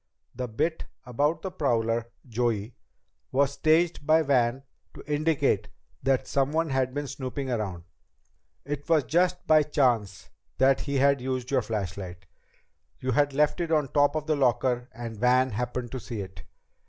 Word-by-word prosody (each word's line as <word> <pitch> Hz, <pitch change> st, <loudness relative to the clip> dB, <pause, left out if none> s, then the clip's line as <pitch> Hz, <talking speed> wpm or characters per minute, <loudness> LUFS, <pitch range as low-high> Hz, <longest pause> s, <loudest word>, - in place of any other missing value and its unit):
The 125 Hz, 0 st, -4 dB
bit 160 Hz, +9 st, -2 dB, 0.2 s
about 145 Hz, +6 st, 0 dB
the 190 Hz, -, -4 dB
prowler, 115 Hz, -7 st, 0 dB, 0.2 s
Joey, 115 Hz, -2 st, -1 dB, 0.6 s
was 140 Hz, +1 st, +2 dB
staged 160 Hz, +3 st, +2 dB
by 160 Hz, +1 st, +5 dB
Van 130 Hz, -2 st, +1 dB, 0.3 s
to -, -, -10 dB
indicate 150 Hz, +1 st, +1 dB, 0.3 s
that 135 Hz, -1 st, +1 dB
someone 150 Hz, +3 st, 0 dB
had 130 Hz, -1 st, +1 dB
been 145 Hz, 0 st, -2 dB
snooping 130 Hz, 0 st, -4 dB
around. 100 Hz, -7 st, -3 dB, 0.8 s
It 145 Hz, +2 st, -5 dB
was 160 Hz, -3 st, +4 dB
just 180 Hz, +7 st, +1 dB
by 155 Hz, -1 st, +6 dB
chance 120 Hz, -10 st, 0 dB, 0.3 s
that 135 Hz, +1 st, +4 dB
he 140 Hz, -1 st, -2 dB, 0.2 s
used 130 Hz, 0 st, -4 dB
your 130 Hz, -2 st, +3 dB
flashlight. 95 Hz, -4 st, -5 dB, 0.7 s
You 130 Hz, -, -2 dB
had 145 Hz, +3 st, +2 dB
left 150 Hz, +4 st, +2 dB
it 165 Hz, -1 st, -2 dB
on 150 Hz, -4 st, +2 dB
top 145 Hz, +2 st, +3 dB
of 155 Hz, 0 st, -3 dB
your 155 Hz, -1 st, +1 dB
locker 125 Hz, -1 st, +1 dB
and 115 Hz, -3 st, -7 dB
Van 125 Hz, +2 st, +3 dB
happened 120 Hz, +2 st, -3 dB
to 130 Hz, -, -4 dB
see 115 Hz, -3 st, -6 dB
it." 95 Hz, -4 st, -10 dB
130 Hz, 155 wpm, -27 LUFS, 120-150 Hz, 0.8 s, by